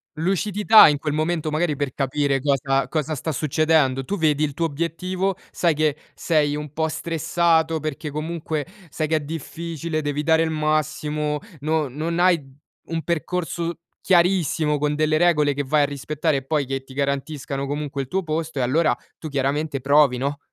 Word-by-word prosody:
Lucidità, 200 Hz, +5 st, +5 dB
in 150 Hz, -, +2 dB
quel 150 Hz, +1 st, -3 dB
momento 155 Hz, 0 st, -1 dB
magari 155 Hz, 0 st, 0 dB
per 140 Hz, -2 st, -3 dB
capire 140 Hz, 0 st, 0 dB
cosa 135 Hz, -1 st, +1 dB
cosa 155 Hz, 0 st, -2 dB
sta 155 Hz, +2 st, -3 dB
succedendo. 150 Hz, -2 st, +2 dB
Tu 200 Hz, +8 st, -3 dB
vedi 155 Hz, -2 st, +2 dB
il 145 Hz, -2 st, -1 dB
tuo 165 Hz, -, 0 dB
obiettivo, 180 Hz, +5 st, -2 dB, 0.2 s
sai 170 Hz, -3 st, +1 dB
che 150 Hz, -1 st, +1 dB, 0.2 s
sei 150 Hz, -3 st, +1 dB
un 150 Hz, -1 st, -6 dB
po' 160 Hz, 0 st, 0 dB
stressato 160 Hz, 0 st, +1 dB
perché 155 Hz, 0 st, -4 dB
comunque 155 Hz, 0 st, -3 dB, 0.2 s
sai 155 Hz, +1 st, -2 dB
che 160 Hz, 0 st, +2 dB
è -, -, -1 dB
difficile, 160 Hz, +1 st, -4 dB
devi 145 Hz, 0 st, -2 dB
dare 160 Hz, +1 st, +4 dB
il 165 Hz, -, +1 dB
massimo, 155 Hz, -1 st, -1 dB, 0.2 s
no 155 Hz, 0 st, 0 dB
non 160 Hz, +6 st, -3 dB
hai 180 Hz, -2 st, +4 dB, 0.4 s
un 165 Hz, -1 st, -3 dB
percorso 170 Hz, 0 st, -2 dB, 0.2 s
chiarissimo 170 Hz, -5 st, +2 dB
con 150 Hz, 0 st, 0 dB
delle 155 Hz, 0 st, +2 dB
regole 150 Hz, -4 st, +3 dB
che 145 Hz, +1 st, -2 dB
vai 145 Hz, +2 st, +2 dB
a -, -, +4 dB
rispettare 150 Hz, +1 st, -1 dB
e 135 Hz, -, -6 dB
poi 150 Hz, -2 st, 0 dB
che 135 Hz, 0 st, -3 dB
ti 135 Hz, -, -14 dB
garantiscano 140 Hz, 0 st, -2 dB
comunque 145 Hz, -1 st, -3 dB
il 130 Hz, -, -6 dB
tuo 190 Hz, +5 st, -1 dB
posto 160 Hz, -1 st, -3 dB
e -, -, +1 dB
allora 155 Hz, +6 st, +2 dB, 0.2 s
tu 160 Hz, -, -6 dB
chiaramente 140 Hz, 0 st, -1 dB
provi, 140 Hz, -2 st, +4 dB
no? 140 Hz, +3 st, -2 dB
155 Hz, 175 wpm, -23 LUFS, 145-165 Hz, 0.4 s, Lucidità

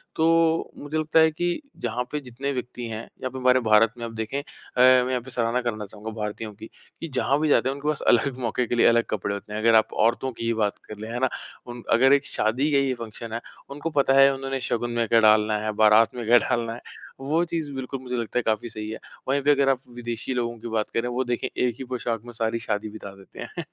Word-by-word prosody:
तो 165 Hz, 0 st, +2 dB
मुझे 145 Hz, +2 st, -4 dB
लगता 155 Hz, +1 st, +2 dB
है 160 Hz, 0 st, +5 dB
कि 175 Hz, -, -2 dB, 0.2 s
जहाँ 120 Hz, +1 st, -1 dB
पे 150 Hz, -, -1 dB
जितने 135 Hz, +1 st, -5 dB
व्यक्ति 125 Hz, -1 st, -5 dB
हैं, 110 Hz, -1 st, -5 dB, 0.2 s
यहाँ 130 Hz, -, -2 dB
पे 130 Hz, -, -7 dB
हमारे 130 Hz, 0 st, +4 dB
भारत 110 Hz, 0 st, +4 dB
में 120 Hz, -, -5 dB
आप 115 Hz, -, -6 dB
देखें 110 Hz, +4 st, -3 dB
अ, -, -, -7 dB, 0.4 s
मैं 130 Hz, 0 st, +6 dB
यहाँ 125 Hz, -1 st, 0 dB
पे 130 Hz, -, -12 dB
सराहना 120 Hz, +1 st, 0 dB
करना 110 Hz, -3 st, -3 dB
चाहूँगा 105 Hz, +2 st, -8 dB
भारतीयों 105 Hz, 0 st, -5 dB
की, 110 Hz, +2 st, -11 dB, 0.3 s
कि 165 Hz, -, -3 dB
जहाँ 140 Hz, +2 st, +2 dB
भी 155 Hz, 0 st, +1 dB
जाते 130 Hz, -, +3 dB
हैं, -, -, -1 dB
उनके 140 Hz, +1 st, -6 dB
पास 150 Hz, -1 st, 0 dB
अलग 125 Hz, +2 st, +3 dB
मौक़े 125 Hz, 0 st, -1 dB
के 120 Hz, -, -1 dB
लिए 120 Hz, -, +4 dB
अलग 115 Hz, 0 st, +4 dB
कपड़े 100 Hz, -1 st, -2 dB
होते 100 Hz, +1 st, -7 dB
हैं। 105 Hz, -, -2 dB
अगर 115 Hz, 0 st, +5 dB
आप 110 Hz, -, +3 dB
औरतों 120 Hz, +3 st, +1 dB
की 115 Hz, -1 st, -6 dB
ही 115 Hz, -, +1 dB
बात 105 Hz, -2 st, 0 dB
कर 105 Hz, -, -8 dB
लें, 110 Hz, +1 st, -7 dB
है 120 Hz, -, -3 dB
ना, 130 Hz, -, +2 dB, 0.4 s
उन 120 Hz, -1 st, -8 dB
अगर 130 Hz, +4 st, +5 dB
एक 140 Hz, 0 st, +3 dB
शादी 130 Hz, +8 st, 0 dB
का 140 Hz, -, +4 dB
ये 135 Hz, -1 st, +2 dB
फ़ंक्शन 115 Hz, -1 st, -8 dB
है, 115 Hz, -, -3 dB, 0.3 s
उनको 145 Hz, +3 st, -4 dB
पता 135 Hz, -1 st, +3 dB
है, 135 Hz, 0 st, +7 dB
उन्होंने 135 Hz, 0 st, -3 dB
शगुन 120 Hz, +1 st, -1 dB
में 120 Hz, -1 st, 0 dB
क्या 115 Hz, +1 st, +5 dB
डालना 110 Hz, -1 st, +4 dB
है, 110 Hz, -, 0 dB
बरात 110 Hz, +2 st, +5 dB
में 120 Hz, -2 st, -5 dB
क्या 120 Hz, +2 st, +6 dB
डालना 115 Hz, -2 st, 0 dB
है, 120 Hz, -, -9 dB, 0.4 s
वो 150 Hz, +5 st, +1 dB
चीज़ 165 Hz, -4 st, -3 dB
बिल्कुल 130 Hz, 0 st, -5 dB
मुझे 125 Hz, -1 st, -4 dB
लगता 120 Hz, +1 st, -1 dB
है -, -, -3 dB
काफ़ी 110 Hz, +1 st, -1 dB
सही 110 Hz, -1 st, -6 dB
है। 110 Hz, -, -6 dB, 0.3 s
वहीं 140 Hz, +1 st, +2 dB
पे 145 Hz, +2 st, +4 dB
अगर 140 Hz, -1 st, +3 dB
आप 135 Hz, -2 st, +2 dB, 0.2 s
विदेशी 120 Hz, +1 st, -4 dB
लोगों 120 Hz, -1 st, -2 dB
की 120 Hz, -, -7 dB
बात 110 Hz, -2 st, -1 dB
करें, 115 Hz, +1 st, 0 dB
वो 125 Hz, +2 st, -1 dB
देखें 120 Hz, -1 st, -2 dB
एक 125 Hz, -2 st, +1 dB
ही -, -, -4 dB
पोशाक 120 Hz, -3 st, -3 dB
में 120 Hz, -, -10 dB
सारी 115 Hz, 0 st, -1 dB
शादी 110 Hz, -1 st, -3 dB
बिता 100 Hz, -2 st, -9 dB
देते 95 Hz, -1 st, -16 dB
हैं। 175 Hz, -3 st, -7 dB
120 Hz, 260 wpm, -25 LUFS, 110-135 Hz, 0.4 s, है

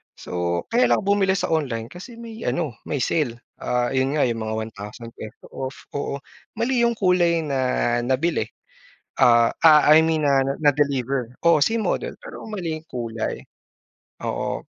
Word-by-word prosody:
So, 85 Hz, -1 st, -2 dB
kaya 245 Hz, +2 st, +4 dB
lang -, -, +3 dB
ako 200 Hz, -, +1 dB
bumili 190 Hz, -1 st, +2 dB
sa 180 Hz, -, -2 dB
online 125 Hz, -8 st, -1 dB
kasi 210 Hz, +7 st, -10 dB
may 230 Hz, -1 st, -9 dB
ano, 155 Hz, -9 st, -1 dB
may 140 Hz, -4 st, -1 dB
sale, 120 Hz, -7 st, 0 dB, 0.2 s
ah, 125 Hz, 0 st, 0 dB
yun 135 Hz, +2 st, +1 dB
nga, 150 Hz, -, +3 dB
yung 115 Hz, -1 st, -2 dB
mga 110 Hz, 0 st, -3 dB
₱1,000 110 Hz, +1 st, -10 dB
off, 130 Hz, 0 st, -5 dB, 0.2 s
oo 140 Hz, 0 st, -3 dB, 0.4 s
mali 235 Hz, +2 st, +1 dB
yung 235 Hz, -, -1 dB
kulay 175 Hz, -4 st, +2 dB
na 140 Hz, -3 st, -1 dB, 0.4 s
nabili 130 Hz, -1 st, 0 dB, 0.7 s
ah 120 Hz, -1 st, +5 dB
ah, 155 Hz, -2 st, +7 dB
I 160 Hz, +1 st, +8 dB
mean 160 Hz, -1 st, +1 dB
na 135 Hz, -1 st, +4 dB, 0.2 s
na-deliver, 140 Hz, -4 st, +1 dB, 0.2 s
oo 170 Hz, -3 st, +6 dB
same 225 Hz, +7 st, 0 dB
model -, -, -1 dB
pero -, -, -9 dB
mali 180 Hz, -7 st, -3 dB
yung -, -, -21 dB
kulay, 115 Hz, -2 st, -3 dB, 0.8 s
oo. -, -, -3 dB
145 Hz, 160 wpm, -23 LUFS, 120-175 Hz, 0.8 s, I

